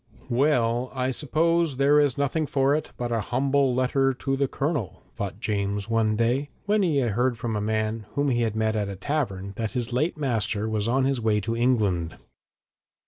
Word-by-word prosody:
'Well, 125 Hz, -2 st, +2 dB
I 130 Hz, 0 st, 0 dB
suppose 160 Hz, +2 st, +1 dB
there 140 Hz, +2 st, +5 dB
is 145 Hz, -3 st, +2 dB
nothing 145 Hz, +2 st, 0 dB
for 135 Hz, 0 st, +2 dB
it 155 Hz, 0 st, -1 dB
but 120 Hz, -1 st, -3 dB
a 115 Hz, -1 st, +1 dB
humble 135 Hz, +3 st, +1 dB
letter 135 Hz, +1 st, +2 dB
to 135 Hz, +1 st, -1 dB
the 140 Hz, 0 st, +1 dB
Colonel,' 140 Hz, -, -3 dB
thought -, -, -5 dB
James 100 Hz, 0 st, -2 dB
one 110 Hz, -1 st, +2 dB
day, 120 Hz, +6 st, +1 dB, 0.2 s
when 210 Hz, +1 st, +2 dB
he 165 Hz, -6 st, +2 dB
heard 120 Hz, +1 st, 0 dB
from 115 Hz, -1 st, -3 dB
a 105 Hz, -, -1 dB
man 110 Hz, 0 st, -1 dB
whom 145 Hz, 0 st, +1 dB
he 120 Hz, -2 st, +1 dB
met 110 Hz, 0 st, -1 dB
at 105 Hz, -2 st, -1 dB
a 100 Hz, -, -5 dB
tavern 100 Hz, -4 st, -3 dB
that 110 Hz, -2 st, -3 dB
his 120 Hz, -2 st, -2 dB
late 155 Hz, +7 st, 0 dB
master 110 Hz, -6 st, -1 dB
was 110 Hz, -1 st, -1 dB
on 130 Hz, +3 st, +2 dB
his 135 Hz, -3 st, 0 dB
way 110 Hz, -2 st, +2 dB
to 115 Hz, +3 st, -2 dB
England. 105 Hz, -9 st, +1 dB
120 Hz, 190 wpm, -25 LUFS, 110-140 Hz, 0.2 s, there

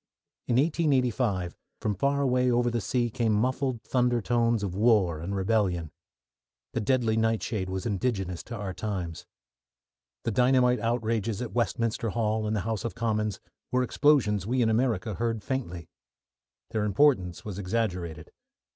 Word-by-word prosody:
In 120 Hz, -, +1 dB
1885, 125 Hz, -, +1 dB, 0.2 s
from 105 Hz, -, -1 dB
far 140 Hz, +7 st, +1 dB
away 125 Hz, -2 st, +2 dB
over 120 Hz, 0 st, +2 dB
the 120 Hz, -1 st, -1 dB
sea 120 Hz, +4 st, 0 dB
came 115 Hz, -2 st, +1 dB
muffled 125 Hz, +1 st, 0 dB
thunder 125 Hz, 0 st, +1 dB
tones 115 Hz, -1 st, +1 dB
of 95 Hz, -3 st, -2 dB
war 100 Hz, -6 st, +3 dB
and 95 Hz, +5 st, -4 dB
rebellion. 95 Hz, -5 st, 0 dB, 0.8 s
The -, -, 0 dB
deadly 115 Hz, -1 st, +2 dB
nightshade 110 Hz, -3 st, 0 dB
was 95 Hz, 0 st, -3 dB
indigenous 95 Hz, -5 st, -1 dB
to 115 Hz, -, -6 dB
our 100 Hz, -4 st, -4 dB
times. 90 Hz, -4 st, -4 dB, 1.0 s
The 115 Hz, -, -1 dB
dynamite 125 Hz, +2 st, +3 dB
outrages 115 Hz, -2 st, -1 dB
at 120 Hz, -, -6 dB
Westminster 115 Hz, 0 st, 0 dB
Hall 110 Hz, 0 st, 0 dB
and 110 Hz, -, 0 dB
the 105 Hz, -, 0 dB
House 110 Hz, -1 st, -3 dB
of 115 Hz, -, -4 dB
Commons 110 Hz, -3 st, -1 dB, 0.3 s
were 125 Hz, 0 st, +2 dB
explosions 120 Hz, -8 st, +2 dB
we 125 Hz, +1 st, +2 dB
in 110 Hz, -, +2 dB
America 110 Hz, -2 st, +1 dB
heard 115 Hz, +1 st, -2 dB
faintly. 90 Hz, -, -4 dB, 0.8 s
Their 110 Hz, -2 st, 0 dB
importance 100 Hz, -, +2 dB
was 100 Hz, -2 st, -5 dB
exaggerated. 90 Hz, -6 st, -2 dB
110 Hz, 145 wpm, -28 LUFS, 100-125 Hz, 1.0 s, war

